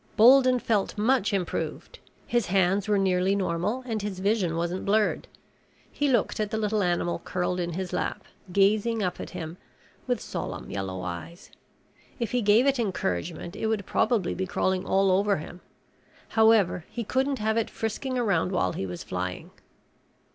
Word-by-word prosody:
Bolden 255 +2 +7
felt 220 -4 0
much 220 0 +2
improved. 190 -4 -3 0.3
His 240 -5 0
hands 195 +2 +2
were 210 -1 +3
nearly 190 0 +2
normal 195 +6 -1
and 225 -4 -2
his 205 -2 -4
vision 190 -3 +1
wasn't 175 +2 -2
blurred. 210 +1 +1 0.6
He 290 -1 0
looked 245 - +1
at 210 -1 0
the 220 - -2
little 215 -1 0
animal 175 -1 0
curled 180 0 -2
in 175 -1 -2
his 185 +1 -4
lap, 180 - -2 0.3
gazing 210 +3 +2
up 180 -1 -2
at - - -6
him 170 -1 -7 0.5
with - - 0
solemn - - -6
yellow 95 -2 -4
eyes. 90 - -7 0.7
If 235 -3 -2
he 250 - +1
gave 215 +4 +4
it 275 -2 +2
encouragement 175 - -2
it 220 - -2
would 215 -3 -1
probably 220 -8 +1
be 190 0 -3
crawling 185 +1 0
all 195 0 +3
over 200 +2 +2
him. 175 +3 -9 0.7
However, 220 -6 +4
he 235 - -4
couldn't 265 +5 0
have 220 0 0
it 225 -1 0
frisking 255 +4 -3
around 195 -7 +1
while 185 - +1
he 95 - -3
was 90 -1 -6
flying. 90 0 -4
200 Hz, 165 wpm, -27 LUFS, 180-220 Hz, 0.7 s, Bolden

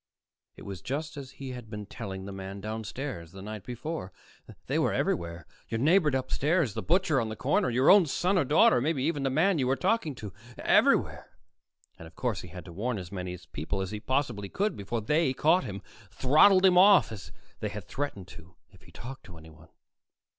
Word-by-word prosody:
It - - -12
was 95 -4 -7
just 150 - -4
as 140 -3 -8
he 135 -2 -7
had 125 -3 -9
been 105 -1 -6
telling 95 0 -7
the 100 - -7
man 95 0 -7
downstairs 110 - -6
the 95 - -10
night 105 -1 -7
before: 125 - -5 0.5
they - - 0
were - - +2
everywhere 85 -1 -2 0.2
your 115 - -2
neighbor 160 +4 +4
upstairs, 140 - 0
the - - -3
butcher 165 -6 +2
on 110 - -3
the 110 - -5
corner, 130 +1 +1
your 125 +3 +4
own 195 -4 +6
son 180 +7 0
or 180 - +3
daughter, 130 -3 +4
maybe 145 -1 0
even 150 -1 0
the 135 - 0
man 160 +6 +2
you 130 - +1
were 135 - +2
talking 155 - 0
to 105 -5 -8 0.2
everywhere! - - +2 0.6
And 80 - -10
of 80 - -17
course 115 -8 -2
he - - -10
had 90 +1 -10
to 85 - -10
warn 115 +6 -2
as 90 -2 -8
many 90 -2 -5
people 95 +5 -3
as 95 -1 -3
he 105 - -4
possibly 115 -5 -2
could 210 +2 -1
before 105 +4 -4
they 150 +4 +1
caught 165 +7 +3
him, 100 -1 -6 0.3
throttled 155 - +5
him 180 -1 +6
off, 195 - +6
as 105 -3 -9 0.3
they - - -2
had - - -7
threatened 135 -11 -4
to 85 +1 -14 0.2
if - - -20
he - - -18
talked 130 +2 -9
to 85 -4 -12
anyone. 80 0 -16
125 Hz, 205 wpm, -28 LUFS, 95-150 Hz, 0.6 s, own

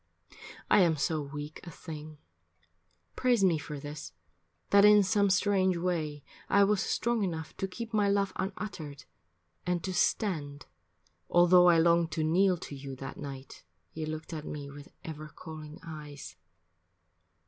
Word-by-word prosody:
I - - +5
am 170 -4 +4
so 155 +2 0
weak 145 +1 -7
a 175 - -8
thing, 155 -1 -9 1.0
praise 245 -5 +2
me 170 -5 +4
for 150 0 -7
this, 145 - -8 0.6
That 200 0 +7
in 210 0 +8
some 200 0 +2
strange 190 -1 +2
way 160 -5 -2 0.3
I 200 - +5
was 200 -1 +2
strong 235 +2 0
enough 160 -4 -4
To 195 - -2
keep 225 +5 -7
my 205 -2 +3
love 200 -1 +1
unuttered 180 -7 -5 0.6
and 180 -1 -1
to 190 - -3
stand 150 -8 0 0.7
Altho' 175 +1 +6
I 170 -1 +6
longed 170 0 +3
to 160 - 0
kneel 180 +4 +3
to 155 - -9
you 135 -1 -7
that 135 +1 -8
night 140 -2 -8 0.3
You 160 -1 -4
looked 155 +1 -6
at 155 -2 -5
me 145 -2 -6
with 145 0 -11 0.2
ever 155 -1 -7
calling 155 0 -10
eyes. 145 - -9
165 Hz, 150 wpm, -30 LUFS, 150-190 Hz, 1.0 s, in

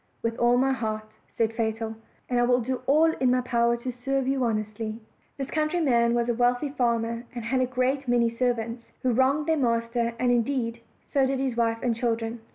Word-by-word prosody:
"With 230 0 -1
all 240 +1 +4
my 265 +1 +3
heart," 215 -3 -3 0.3
said 225 -1 +1
Fatal, 225 0 -2 0.3
"and 245 -1 +1
I - - +4
will 245 +1 +3
do 255 +2 -3
all 315 +3 +5
in 255 - +2
my 250 0 +3
power 235 -1 +1
to 250 +2 -4
serve 265 +2 -2
you 270 -1 +1
honestly." 215 -1 -2 0.4
This 275 -1 -5
countryman 300 -7 +2
was 235 0 +1
a 240 - +2
wealthy 245 +4 +1
farmer, 235 -3 -1
and 235 -2 -5
had 255 +2 +1
a 255 - +1
great 260 +2 0
many 240 -1 +3
servants, 230 -1 -2 0.2
who 255 - +2
wronged 270 +5 +2
their 320 0 +2
master; 235 -2 0
and, 250 0 +2
indeed, 235 -1 0 0.2
so 275 -2 +2
did 270 0 0
his 260 -2 -1
wife 230 0 0
and 240 -2 +1
children. 230 0 -2
240 Hz, 200 wpm, -26 LUFS, 230-260 Hz, 0.4 s, all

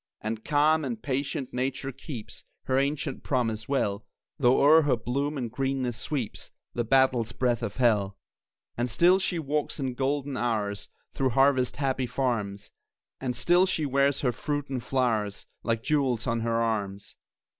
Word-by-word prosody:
And, 110 0 -4
calm 155 +2 +3
and 120 -5 -3
patient, 135 +1 -3
Nature 130 +1 -2
keeps 135 -3 -8 0.2
Her 130 0 +1
ancient 140 0 -1
promise 115 -4 -1
well, 105 -7 0 0.4
Though 125 -1 +4
o'er 155 +3 +7
her 145 -4 +2
bloom 140 +6 -2
and 120 -4 -3
greenness 135 -2 -1
sweeps 130 -4 -4 0.2
The 120 - -1
battle's 125 -2 +3
breath 120 -2 0
of 110 -4 -4
hell. 105 -6 +2 0.6
And 120 +1 -1
still 175 - +5
she 185 -2 -1
walks 150 0 -2
in 130 -2 -2
golden 135 +1 -1
hours 105 -4 -2 0.2
Through 135 - +1
harvest 130 0 +3
happy 130 -2 -1
farms, 105 -7 -2 0.5
And 125 -2 -2
still 175 +9 +4
she 160 -5 0
wears 140 0 +2
her 125 - +2
fruits 145 +3 -3
and 130 -2 -2
flowers 115 -6 -1 0.2
Like 115 -1 -1
jewels 130 -6 +1
on 115 -1 0
her 115 0 0
arms. 100 -4 -2
130 Hz, 155 wpm, -27 LUFS, 115-140 Hz, 0.6 s, o'er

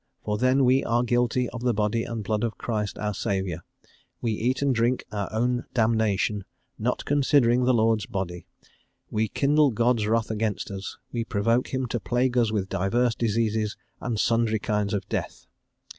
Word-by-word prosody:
For 105 0 -2
then 130 +2 +3
we 130 +2 +4
are 120 +1 +1
guilty 125 +1 +1
of 125 - -7
the 120 -2 +1
Body 105 +2 0
and 115 -2 -4
Blood 105 +2 -1
of 115 -1 -2
Christ 105 -4 -3
our 105 0 -2
Saviour; 95 -5 -2 0.6
we 115 - -1
eat 125 +6 0
and 140 -2 +3
drink 120 +2 +1
our 100 -2 -3
own 120 +3 0
damnation, 110 -3 +1 0.4
not - - -1
considering 130 -4 +3
the 130 - +4
Lord's 110 -2 +2
Body; 95 -6 -4 0.6
we 110 +1 +1
kindle 145 +5 +3
God's 115 -1 +1
wrath 110 0 +1
against 105 -1 -2
us; 95 0 -6
we 120 -1 -1
provoke 115 +3 +1
him 130 -1 -1
to 120 0 -2
plague 125 +2 0
us 115 -3 +3
with 100 -3 -1
divers 115 +7 +1
diseases, 110 -1 0 0.2
and 115 -4 -2
sundry 115 -1 +2
kinds 105 -1 -1
of 100 - -4
death." - - -4
115 Hz, 175 wpm, -26 LUFS, 105-125 Hz, 0.6 s, we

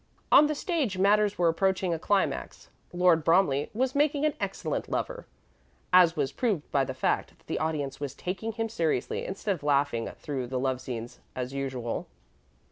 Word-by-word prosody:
On 300 - +8
the 305 - -1
stage 290 - -1
matters 205 +2 +3
were 175 - +3
approaching 185 +1 +1
a 165 - -2
climax. 200 +3 -1 0.2
Lord 175 -2 +3
Bromley 165 -5 +3
was 255 +4 0
making 290 0 +2
an 305 - +2
excellent - - -3
lover, - - -3 0.7
as 175 -2 +7
was 145 -4 0
proved 205 - -1
by 140 - +3
the 130 0 -5
fact - - -1
that - - -29
the - - -2
audience 145 -4 -2
was 145 -3 -5
taking 195 +5 -4
him 225 0 -2
seriously 165 - -1
instead 195 +2 -2
of 175 - -8
laughing 140 -5 +1
through 135 -4 -4
the 130 +1 -3
love 130 -1 -1
scenes 120 -2 -6 0.2
as 125 +1 -4
usual. 130 -4 -3
165 Hz, 175 wpm, -28 LUFS, 135-210 Hz, 0.7 s, On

